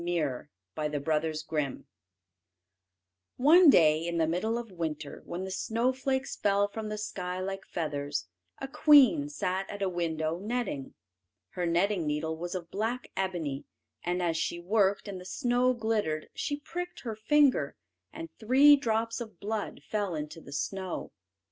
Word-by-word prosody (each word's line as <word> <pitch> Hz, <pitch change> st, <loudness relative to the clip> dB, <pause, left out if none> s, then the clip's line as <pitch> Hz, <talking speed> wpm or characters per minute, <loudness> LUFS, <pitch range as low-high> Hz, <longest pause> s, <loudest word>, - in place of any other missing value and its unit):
CHAPTER 155 Hz, -7 st, -1 dB, 0.3 s
II 150 Hz, 0 st, 0 dB
THE 150 Hz, -1 st, -2 dB
MAGIC 155 Hz, 0 st, -1 dB
MIRROR 150 Hz, -4 st, -1 dB, 1.5 s
One 320 Hz, +6 st, +7 dB
day 155 Hz, -, +5 dB
in 170 Hz, 0 st, -2 dB
the 165 Hz, -, +3 dB
middle 185 Hz, +8 st, 0 dB
of 235 Hz, -3 st, -6 dB
winter, 155 Hz, -4 st, -5 dB
when 175 Hz, +2 st, -4 dB
the 190 Hz, -, -5 dB
snowflakes 260 Hz, +6 st, -1 dB
fell 200 Hz, 0 st, +2 dB
from 215 Hz, +1 st, -6 dB
the 215 Hz, -, -3 dB
sky 185 Hz, -3 st, -4 dB
like 195 Hz, +1 st, -4 dB
feathers, 145 Hz, -, -3 dB, 0.3 s
a -, -, -5 dB
queen 295 Hz, 0 st, +6 dB
sat 190 Hz, -9 st, -2 dB
at 205 Hz, -1 st, -4 dB
a 190 Hz, -, +1 dB
window 165 Hz, -2 st, -2 dB
netting. 210 Hz, -, -3 dB, 0.5 s
Her 180 Hz, -2 st, -2 dB
netting 175 Hz, 0 st, +1 dB
needle 150 Hz, +2 st, -1 dB
was 175 Hz, +3 st, -5 dB
of 170 Hz, -2 st, -6 dB
black 225 Hz, +5 st, -2 dB
ebony, 170 Hz, -8 st, -2 dB, 0.4 s
and 180 Hz, +1 st, -1 dB
as 165 Hz, -2 st, +1 dB
she 170 Hz, +2 st, -2 dB
worked, 200 Hz, +2 st, +1 dB
and 190 Hz, -2 st, -6 dB
the -, -, -9 dB
snow 245 Hz, +5 st, +1 dB
glittered, 215 Hz, -9 st, -1 dB
she 290 Hz, -, -2 dB
pricked 355 Hz, +4 st, -6 dB
her 225 Hz, -3 st, -4 dB
finger, 250 Hz, -, +3 dB, 0.4 s
and 165 Hz, -, -7 dB
three 270 Hz, +6 st, +7 dB
drops 230 Hz, -3 st, -1 dB
of 220 Hz, -6 st, -8 dB
blood 210 Hz, 0 st, -4 dB
fell 205 Hz, -5 st, -2 dB
into 150 Hz, +2 st, -6 dB
the 140 Hz, -, -12 dB
snow. 185 Hz, +7 st, -3 dB
190 Hz, 155 wpm, -29 LUFS, 160-230 Hz, 1.5 s, One